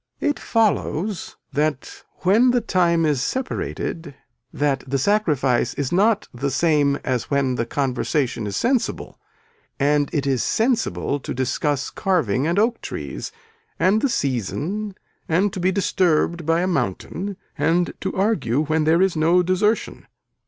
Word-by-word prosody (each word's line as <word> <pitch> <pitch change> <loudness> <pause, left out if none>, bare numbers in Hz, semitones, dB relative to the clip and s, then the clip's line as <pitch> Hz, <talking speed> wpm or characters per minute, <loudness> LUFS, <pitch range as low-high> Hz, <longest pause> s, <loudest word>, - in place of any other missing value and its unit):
It 295 0 0
follows 210 -4 0 0.2
that 150 -2 -2 0.2
when 215 +7 +4
the 245 0 +3
time 175 -6 +2
is 145 -5 +1
separated 170 - -3 0.4
that 145 -2 0
the 135 +1 0
sacrifice 135 - +1
is 140 -3 -2
not 210 +4 +2
the 135 +3 -2
same 145 -2 +2
as 125 -3 -2
when 140 -2 +1
the 115 -1 -2
conversation 130 -3 -1
is 100 - -4
sensible 250 0 -1 0.6
and 145 0 +2
it 145 -3 -1
is 135 -4 +1
sensible 225 - 0
to - - -6
discuss 135 +2 -1
carving 155 - 0
and 170 +3 0
oak 230 +3 +2
trees - - -6 0.5
and 200 +4 +3
the 280 - +2
season 170 - -2 0.3
and 185 +5 +2
to - - -4
be 180 +1 +2
disturbed 170 -4 +1
by 165 +1 +3
a 180 - 0
mountain 175 - -2 0.2
and 165 +4 +1
to 190 - -2
argue 165 - +1
when 155 0 0
there 165 +4 +4
is 190 -3 +1
no 170 +3 +3
desertion. 200 +5 0
165 Hz, 145 wpm, -22 LUFS, 140-195 Hz, 0.6 s, when